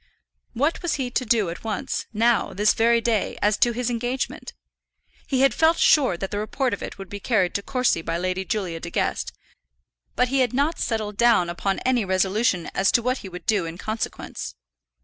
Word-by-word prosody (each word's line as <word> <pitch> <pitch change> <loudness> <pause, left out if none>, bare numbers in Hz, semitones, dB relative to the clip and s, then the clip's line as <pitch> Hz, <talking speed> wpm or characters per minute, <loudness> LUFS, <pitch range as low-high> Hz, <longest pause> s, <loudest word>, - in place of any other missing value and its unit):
What 285 +7 0
was 345 - 0
he 255 -3 -3
to 255 - -1
do 215 -6 +2
at 170 - -9
once, 215 -4 -3
now, 230 +1 +2
this 210 +2 +3
very 235 +1 +3
day, 225 -3 0
as 210 0 +2
to 240 - +3
his 245 +1 -2
engagement? 245 +2 -3 0.7
He 265 -2 +1
had 270 -4 +4
felt 325 +1 +3
sure 260 - +4
that 195 +2 -5
the 205 - -2
report 250 +4 -1
of - - -4
it - - -6
would 195 -1 -8
be 205 - -7
carried 195 -5 +1
to 200 - -1
Courcy 250 -6 0
by 165 +1 -2
Lady 185 +1 -2
Julia 185 -4 -3
De 170 - -6
Guest, - - -1 0.8
but 250 0 +2
he 270 +1 +1
had 255 -3 +2
not 285 +6 0
settled 215 -3 -2
down 230 -7 +4
upon 195 +2 -1
any 250 -3 +2
resolution 190 0 +1
as 190 0 +2
to 235 - +3
what 255 +2 0
he 195 - -8
would 180 0 -9
do 200 -6 +1
in 165 +1 -7
consequence. 215 +3 -5
220 Hz, 205 wpm, -24 LUFS, 190-250 Hz, 0.8 s, had